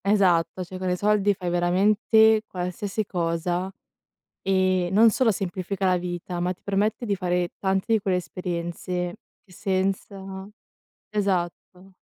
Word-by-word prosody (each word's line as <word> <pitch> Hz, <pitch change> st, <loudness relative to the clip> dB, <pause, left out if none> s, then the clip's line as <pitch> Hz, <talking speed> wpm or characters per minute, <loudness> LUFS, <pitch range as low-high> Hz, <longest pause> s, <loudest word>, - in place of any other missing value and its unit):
esatto, 185 Hz, -3 st, +2 dB
cioè 185 Hz, +1 st, -8 dB
con 185 Hz, 0 st, -2 dB
i 180 Hz, -, +1 dB
soldi 205 Hz, 0 st, +2 dB
fai 180 Hz, -2 st, -4 dB
veramente 210 Hz, +5 st, +4 dB
qualsiasi 190 Hz, +4 st, -3 dB
cosa, 175 Hz, +1 st, -1 dB, 0.7 s
e 185 Hz, -2 st, +2 dB
non 220 Hz, +3 st, +6 dB
solo 240 Hz, -2 st, +3 dB
semplifica 190 Hz, 0 st, -3 dB
la 185 Hz, -1 st, +3 dB
vita, 175 Hz, 0 st, -4 dB
ma 180 Hz, +1 st, 0 dB
ti -, -, -27 dB
permette 210 Hz, +4 st, 0 dB
di 200 Hz, -2 st, 0 dB
fare 180 Hz, -1 st, 0 dB
tante 195 Hz, +3 st, 0 dB
di 220 Hz, -, +4 dB
quelle 190 Hz, -2 st, 0 dB
esperienze 175 Hz, 0 st, -4 dB, 0.3 s
che 190 Hz, -, -23 dB
senza 190 Hz, 0 st, -3 dB, 0.6 s
esatto. 190 Hz, -2 st, -2 dB
185 Hz, 135 wpm, -25 LUFS, 180-200 Hz, 0.7 s, non